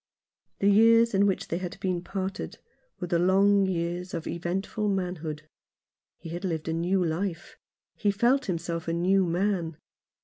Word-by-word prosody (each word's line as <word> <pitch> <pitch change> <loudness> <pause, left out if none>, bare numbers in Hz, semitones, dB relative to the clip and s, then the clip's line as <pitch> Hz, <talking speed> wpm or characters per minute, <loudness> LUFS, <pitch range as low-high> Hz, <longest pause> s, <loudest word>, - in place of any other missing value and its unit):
The 200 - +1
years 230 +3 +6
in 200 +1 +4
which 195 - -1
they 170 - -1
had 180 -2 -6
been 180 -2 -1
parted 190 0 -4 0.4
were 180 - -3
the 175 -1 +1
long 195 +2 +4
years 175 0 -2
of 165 - -4
eventful 190 +5 -2
manhood. 170 -5 -3 0.7
He 165 - -10
had 175 +3 -5
lived 165 -4 -2
a 160 - 0
new 180 +3 +1
life; 170 +2 -3 0.4
he 210 - 0
felt 240 +7 +2
himself 170 -2 -3
a 165 - 0
new 185 +2 +2
man. 175 -2 -1
180 Hz, 160 wpm, -27 LUFS, 170-195 Hz, 0.7 s, years